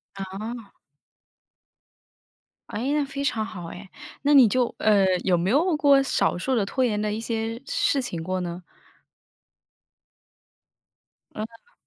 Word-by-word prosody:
哦。 200 +3 -7 2.0
哎， 245 +6 -2
那 300 -1 +2
非 275 0 -5
常 230 -6 0
好 185 -6 -7
诶， 185 +3 -10 0.3
那 290 - +2
你 260 -4 +8
就， 245 +2 +1
呃， 210 -2 +4 0.2
有 185 - +3
没 175 +2 0
有 315 - +3
过 285 -2 +5
少 270 - +1
数 260 +9 -1
的 220 - +2
拖 255 +6 0
延 210 -3 0
的 210 0 -1
一 215 - -3
些 225 0 -3
事 275 - +1
情 175 -10 -4
过 185 +3 -2
呢？ 175 0 -5 2.7
哦。 230 - -9
225 Hz, 140 characters per minute, -25 LUFS, 195-270 Hz, 2.7 s, 你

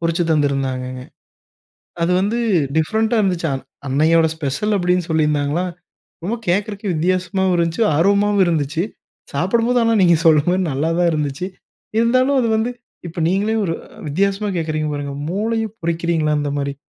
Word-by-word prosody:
பொரிச்சு 165 +1 +1
தந்திருந்தாங்கங்க. 135 -4 0 1.0
அது 170 +2 +2
வந்து 205 +5 0 0.4
டிஃபரண்ட்‌ 220 +8 +1
டா - - +3
இருந்துச்சா 180 -5 0
அ - - -4 0.3
அன்னையோட 160 +4 +3
ஸ்பெஷல் 160 +8 -1
அப்டின்னு 180 -1 +1
சொல்லியிருந்தாங்களா 150 +1 +1 0.6
ரொம்ப 225 +5 -1
கேட்கறக்கே 200 +3 -1
வித்தியாசமாவும் 185 +3 0
இருந்துச்சு, 170 +5 0
ஆர்வமாவும் 200 +4 +3
இருந்துச்சு. 160 -1 0 0.5
சாப்பிடும்போது 230 - +2
ஆனா 230 0 +3
நீங்க 170 -2 +5
சொல்ற 155 -2 +6
மாரி 185 +1 +1
நல்லா 145 +5 0
தான் 175 -1 +3
இருந்துச்சு. 150 +2 -2 0.5
இருந்தாலும் 255 +4 +3
அது 235 - +1
வந்து 225 +3 -1 0.4
இப்ப 165 - -10
நீங்களே 205 +5 +1
ஒரு 165 -3 -1 0.3
வித்தியாசமா 200 +6 0
கேட்குறீங்க 155 -1 -2
பாருங்க 140 -1 -4 0.2
மூளையும் 220 +2 -1
பொரிக்கிறீர்களா? 165 -2 0
அந்த 145 -1 -2
மாரி 140 0 -2
170 Hz, 140 wpm, -19 LUFS, 155-205 Hz, 1.0 s, சொல்ற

